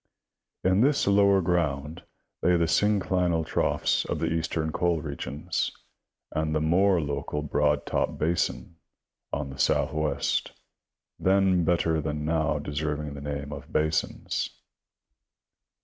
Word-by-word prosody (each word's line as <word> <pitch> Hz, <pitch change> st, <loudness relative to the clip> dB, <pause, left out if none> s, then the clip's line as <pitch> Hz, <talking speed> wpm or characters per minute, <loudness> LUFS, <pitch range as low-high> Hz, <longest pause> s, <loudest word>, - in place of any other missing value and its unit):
In 95 Hz, +2 st, +3 dB
this 140 Hz, +3 st, +3 dB
lower 100 Hz, -1 st, +4 dB
ground 80 Hz, -4 st, -1 dB, 0.4 s
lay 90 Hz, 0 st, +4 dB
the 85 Hz, -, +2 dB
synclinal 90 Hz, -3 st, +1 dB
troughs -, -, +1 dB
of -, -, -2 dB
the -, -, -1 dB
eastern 80 Hz, -1 st, -1 dB
coal 85 Hz, 0 st, +1 dB
regions, 75 Hz, +2 st, -3 dB, 0.6 s
and 80 Hz, 0 st, -1 dB
the -, -, +2 dB
more 90 Hz, +4 st, +3 dB
local 75 Hz, 0 st, -3 dB
Broad 75 Hz, 0 st, +1 dB
Top -, -, -1 dB
basin, 85 Hz, +2 st, 0 dB
BT, 85 Hz, -, -21 dB, 0.7 s
on 70 Hz, -, -6 dB
the 70 Hz, -, -11 dB
southwest, 75 Hz, +1 st, 0 dB, 0.7 s
then 95 Hz, -2 st, +3 dB
better 80 Hz, -1 st, +1 dB
than 75 Hz, 0 st, -3 dB
now 80 Hz, -1 st, +1 dB
deserving 75 Hz, 0 st, -3 dB
the 70 Hz, -, -8 dB
name 70 Hz, 0 st, -4 dB
of -, -, -9 dB
basins. 80 Hz, 0 st, -1 dB
80 Hz, 125 wpm, -27 LUFS, 75-90 Hz, 0.7 s, lower